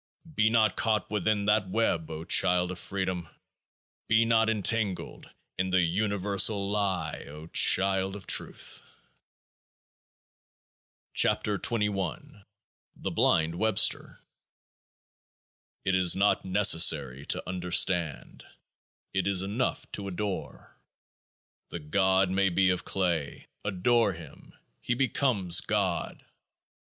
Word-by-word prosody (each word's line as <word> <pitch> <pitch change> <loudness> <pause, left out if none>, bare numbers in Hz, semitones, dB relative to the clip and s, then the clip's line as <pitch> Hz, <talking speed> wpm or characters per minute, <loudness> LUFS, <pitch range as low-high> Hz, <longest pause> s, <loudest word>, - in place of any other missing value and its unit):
Be 110 -5 +2
not 110 -3 +2
caught 110 -4 -1
within 105 0 0
that 105 -2 +1
web, 90 -6 -1
O 80 0 -7
child 90 +1 +2
of 90 - -8
Freedom! 95 -4 -4 0.8
Be 110 +1 +3
not 115 -1 +2
entangled 105 -2 -2 0.3
in 95 0 0
the 95 0 +2
universal 100 +2 0
lie, 95 -6 -2
O 75 +2 -10
child 95 +3 +3
of 100 - -10
Truth! - - 0 2.3
29 105 -2 +1
KEOAAH 100 - -1
KA 100 - -20 0.5
THE - - -5
BLIND 80 +1 +1
WEBSTER 110 +5 +1 1.7
It 95 - +1
is 90 -2 +4
not 100 0 +1
necessary 80 -9 +3
to - - -1
understand: 90 -3 -1 0.7
it 95 -1 -1
is 95 -2 +2
enough 105 +7 -2
to 100 -1 -6
adore. 100 +1 -6 0.9
The - - -6
god 95 +4 +1
may 95 0 +1
be 90 +1 +2
of 90 - -3
clay: 85 -7 -2 0.2
adore 100 +2 +1
him; 80 -1 -14 0.3
he 120 - -2
be 135 +1 +1
comes 100 -11 +2
GOD. 95 -5 -2
95 Hz, 110 wpm, -27 LUFS, 90-105 Hz, 2.3 s, is